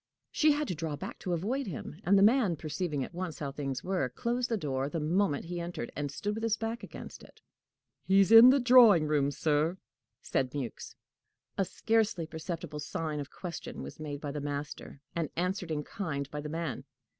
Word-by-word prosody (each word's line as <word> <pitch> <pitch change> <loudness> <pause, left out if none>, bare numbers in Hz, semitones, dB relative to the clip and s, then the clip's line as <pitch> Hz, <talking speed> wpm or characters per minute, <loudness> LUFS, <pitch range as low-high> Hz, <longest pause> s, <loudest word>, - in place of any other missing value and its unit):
She 305 -1 +4
had 295 0 -1
to - - -1
draw 160 -2 -3
back 145 - -7
to 180 - -2
avoid 230 +10 -1
him, 155 -1 -6
and 200 +2 +4
the 195 - +6
man, 215 -5 +4
perceiving 155 -1 -3
at - - -8
once 175 -3 -4
how 140 -2 -4
things 135 -3 -4
were, 180 -8 0
closed 240 - -2
the 225 - +1
door 135 -5 -2
the 165 - -2
moment 165 0 +1
he 175 +1 -4
entered, 170 -8 -5
and 145 0 -2
stood 205 +9 -3
with 220 - -4
his 225 -1 +1
back 225 +1 -3
against - - -9
it. - - -17 0.7
"He's 195 +1 +5
in 225 +2 +11
the 275 +2 +5
drawing 240 -9 +7
room, 145 -2 +2
sir," 155 +4 +1 0.4
said 130 0 -1
Mewks. 130 -5 -5 0.6
A 195 - +1
scarcely 215 -3 +1
perceptible 160 -1 -6
sign 150 +1 -3
of 140 - -5
question 175 -3 -7
was - - -9
made 145 -2 -5
by 145 - -4
the 150 0 -4
master, 145 -1 -5
and 165 -4 -1
answered 180 +1 -1
in 150 -2 -2
kind 145 -8 -4
by 150 - -4
the 150 - -6
man. 160 -3 -3
165 Hz, 200 wpm, -30 LUFS, 145-200 Hz, 0.7 s, in